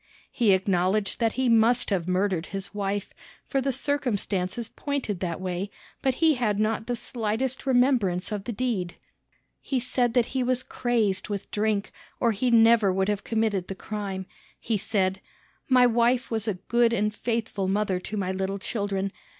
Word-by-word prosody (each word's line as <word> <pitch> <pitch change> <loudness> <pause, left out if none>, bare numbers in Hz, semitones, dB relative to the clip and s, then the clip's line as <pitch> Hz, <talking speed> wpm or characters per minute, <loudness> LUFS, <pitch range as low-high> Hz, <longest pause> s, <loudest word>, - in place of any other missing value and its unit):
He 230 -5 +3
acknowledged 190 +1 +1
that 225 -2 +2
he 260 0 0
must 230 +1 +4
have 180 -3 0
murdered 185 -2 0
his 195 0 -6
wife, 200 0 -2 0.3
for 270 - 0
the 270 +1 0
circumstances 235 -7 -1
pointed 265 -8 -3
that 170 -2 -3
way, 185 +1 -3 0.3
but 265 -2 +1
he 320 +1 +4
had 215 -6 0
not 220 +1 0
the 245 - 0
slightest 240 +3 -3
remembrance 245 -8 +2
of 205 -2 -3
the - - -3
deed. 210 -6 -2 0.7
He 265 - -1
said 245 -1 0
he 250 +2 +1
was 255 0 +1
crazed 220 -6 0
with 200 -1 -4
drink, 210 -1 0 0.3
or 235 - +3
he 235 +4 0
never 225 -3 +5
would 190 +2 0
have 205 -1 -1
committed 220 -5 0
the 195 - -5
crime. 195 -2 -5 0.3
He 225 - -1
said: 195 -2 0 0.5
"My 250 -1 +6
wife 240 +2 +2
was 220 -1 0
a 210 - 0
good 235 +5 +2
and 210 -2 +1
faithful 220 -3 -2
mother 195 -1 0
to 210 +3 -5
my 190 -2 -1
little 190 +1 -2
children. 200 -2 -2
215 Hz, 165 wpm, -26 LUFS, 195-240 Hz, 0.7 s, My